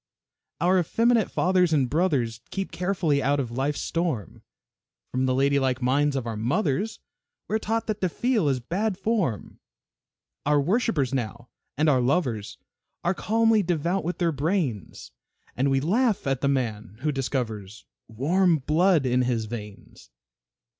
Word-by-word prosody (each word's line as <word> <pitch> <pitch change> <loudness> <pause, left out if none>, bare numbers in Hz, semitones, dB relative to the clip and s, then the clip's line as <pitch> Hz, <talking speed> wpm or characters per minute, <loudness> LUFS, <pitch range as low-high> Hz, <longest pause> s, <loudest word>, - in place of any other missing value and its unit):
Our 185 +2 +3
effeminate 230 +5 +2
fathers 180 -2 +2
and 140 -4 +3
brothers 130 -8 0
Keep 195 -1 -4
carefully 175 -6 0
out 140 +2 +1
of 125 -4 -3
life's 135 +4 -1
storm, 165 - -3 0.7
From 130 +1 0
the 130 - +1
ladylike 135 -1 +2
minds 140 +3 +1
of 130 -3 -2
our 115 -1 -3
mothers 145 - -1 0.5
We 215 - -1
are - - +2
taught 225 +1 -1
that 215 -1 -3
to 185 - +1
feel 225 - +1
is 130 -2 0
"bad 190 - -2
form." 195 - -2 0.8
Our 145 0 +3
worshipers 165 - +1
now 120 -1 -4 0.3
and 155 +2 +2
our 135 -4 +4
lovers 120 - -1 0.5
Are 175 - +2
calmly 225 +3 +2
devout 175 +1 -1
with 175 +1 -3
their 170 -2 +1
brains, 145 - -2 0.4
And 135 +3 +1
we 135 0 +2
laugh 210 - +1
at 135 -2 -1
the 140 - +1
man 115 -6 -2
who 150 +1 +1
discovers 115 -7 -4 0.2
Warm 165 - +2
blood 155 +2 +2
in 125 0 +2
his 120 -3 0
veins. 105 -2 -9
145 Hz, 150 wpm, -25 LUFS, 125-185 Hz, 0.8 s, our